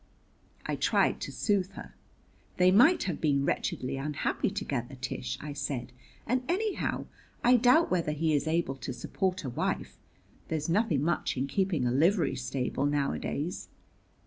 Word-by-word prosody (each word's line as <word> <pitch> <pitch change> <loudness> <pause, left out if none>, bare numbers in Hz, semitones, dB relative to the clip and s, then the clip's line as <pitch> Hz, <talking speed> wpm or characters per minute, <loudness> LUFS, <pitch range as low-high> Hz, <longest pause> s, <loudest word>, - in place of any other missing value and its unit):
I - - -2
tried - - +2
to - - -4
soothe 195 -2 0
her. - - -10 0.6
"They 180 0 +5
might 300 - +6
have 175 -5 -3
been 140 -3 +2
wretchedly 130 -1 -1
unhappy 145 +2 -1
together, - - -3
Tish," 65 +1 -4
I 150 -1 -6
said; 135 -4 -4 0.3
"and, 250 +2 +1
anyhow, 410 +4 -1 0.4
I 245 +1 +6
doubt 250 +8 +4
whether 170 -4 +1
he 155 +1 0
is 145 +1 +1
able 160 -4 0
to 130 0 -5
support 185 +7 -2
a 135 - -3
wife. - - -2 0.5
There's 155 -2 -2
nothing 170 - +2
much 170 -4 0
in 130 - 0
keeping 165 -1 0
a 120 - +2
livery 165 - +3
stable 130 +1 -1
nowadays." 145 +3 -2
155 Hz, 150 wpm, -29 LUFS, 140-190 Hz, 0.6 s, might